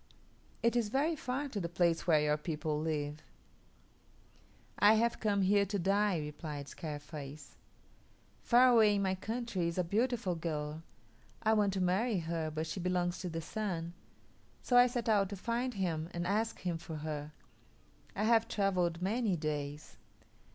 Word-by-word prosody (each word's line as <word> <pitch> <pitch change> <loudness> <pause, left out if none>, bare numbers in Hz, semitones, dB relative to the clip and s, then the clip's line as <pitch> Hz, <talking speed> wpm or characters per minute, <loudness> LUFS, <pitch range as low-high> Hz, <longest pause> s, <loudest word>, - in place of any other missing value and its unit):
It 235 +1 +3
is 230 -3 +1
very 290 +7 +1
far 270 +1 -3
to 215 - -3
the 170 -3 -3
place 170 0 +1
where 155 -3 +5
your 150 0 +2
people 150 -1 -2
live." 150 -1 -2 1.6
"I 205 +3 +7
have 235 +1 +1
come 200 -3 +1
here 200 +2 +4
to 200 +2 -1
die," 200 +1 +2
replied 150 -1 -6
Scarface. 145 -4 -8 0.9
"Far 250 +2 +6
away 220 -4 +5
in 200 - +1
my 190 -1 +1
country 220 -2 -2
is 170 - -3
a 180 - +2
beautiful 215 +1 0
girl. 155 -2 -4 0.6
I 220 0 +4
want 205 -3 +2
to 190 - -1
marry 195 +5 +1
her, 165 -1 -2
but 155 +1 -3
she 165 - -5
belongs 180 0 0
to 180 - -4
the 165 0 -4
Sun; 170 -3 -3 0.7
so 245 - +1
I 245 0 +8
set 240 -1 -3
out 205 -3 +3
to 200 - -5
find 235 +5 -2
him 165 -4 -2
and 175 0 -2
ask 215 +4 0
him 175 -3 -2
for 160 -1 -7
her. 150 -1 -5 0.8
I - - -1
have 225 0 +4
travelled 180 -4 0
many 215 0 +1
days. 150 -2 -4
185 Hz, 165 wpm, -33 LUFS, 160-215 Hz, 1.6 s, I